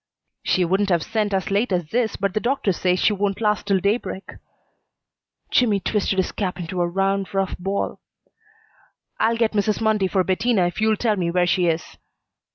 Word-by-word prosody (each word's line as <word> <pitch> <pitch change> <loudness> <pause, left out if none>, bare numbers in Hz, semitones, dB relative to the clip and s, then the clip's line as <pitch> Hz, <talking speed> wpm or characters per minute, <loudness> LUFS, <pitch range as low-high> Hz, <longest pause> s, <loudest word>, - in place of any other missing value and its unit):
"She 185 - +1
wouldn't 195 +3 +1
have 170 -4 +2
sent 215 -2 -1
as 190 0 -1
late 205 +3 +1
as 175 -4 -1
this, 235 -2 0
but 195 -1 -1
the - - +1
doctor 240 -3 0
says 180 +1 +1
she 215 - +3
won't 200 -1 -1
last 210 -2 0
till 195 -2 +3
daybreak." 200 0 -2 1.2
Jimmy 220 -5 +3
twisted 195 0 -1
his 190 - +1
cap 185 -4 -3
into 175 +1 -3
a 175 - +2
round, 195 +2 0
rough 195 -1 0
ball. 195 +2 -2 1.2
"I'll 230 +1 +2
get 230 -1 +2
Mrs. 210 0 0
Mundy 215 -3 +2
for 185 0 +1
Bettina 190 +1 +1
if 175 +4 -3
you'll 220 -1 +3
tell 215 -2 +1
me 175 -2 0
where 180 +1 +2
she 180 0 +2
is." 160 -1 -2
195 Hz, 185 wpm, -22 LUFS, 185-215 Hz, 1.2 s, she